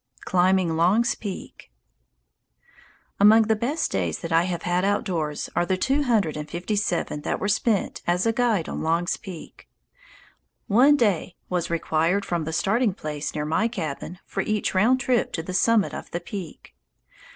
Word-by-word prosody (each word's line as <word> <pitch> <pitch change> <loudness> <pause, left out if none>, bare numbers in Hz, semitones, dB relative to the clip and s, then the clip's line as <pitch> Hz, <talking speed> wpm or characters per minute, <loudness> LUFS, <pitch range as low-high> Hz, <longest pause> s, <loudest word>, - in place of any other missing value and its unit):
Climbing 185 -2 +2
Long's 195 +9 +3
Peak 200 -4 -8 1.5
Among 215 +3 +7
the 220 0 +1
best 275 +9 -1
days 85 -4 -1
that 165 - -5
I 165 +1 +4
have 175 -2 -3
had 180 +1 0
outdoors 180 -7 -1
are 175 - +2
the 185 +2 0
two 270 +9 +1
hundred 220 - +1
and 150 0 -6
fifty 180 +5 -3
seven 175 -7 -1
that - - -2
were 200 - -1
spent 210 0 0
as 180 +3 +1
a 225 - +2
guide 225 -8 +1
on - - -4
Long's 165 +2 0
Peak. 185 -6 -11 1.0
One 265 +8 +5
day 200 - 0
was 180 -2 -1
required 170 +4 0
from 170 -4 -2
the 160 - -3
starting 210 +4 +1
place 150 -3 -5
near 150 -1 -2
my 165 +9 +1
cabin 175 - -5
for 195 - -3
each 215 +1 -1
round 225 +8 +3
trip 250 -2 +1
to 160 - -3
the 185 - -6
summit 215 +2 +2
of - - -7
the 170 - -3
peak. 180 -2 -8
185 Hz, 170 wpm, -24 LUFS, 165-220 Hz, 1.5 s, Among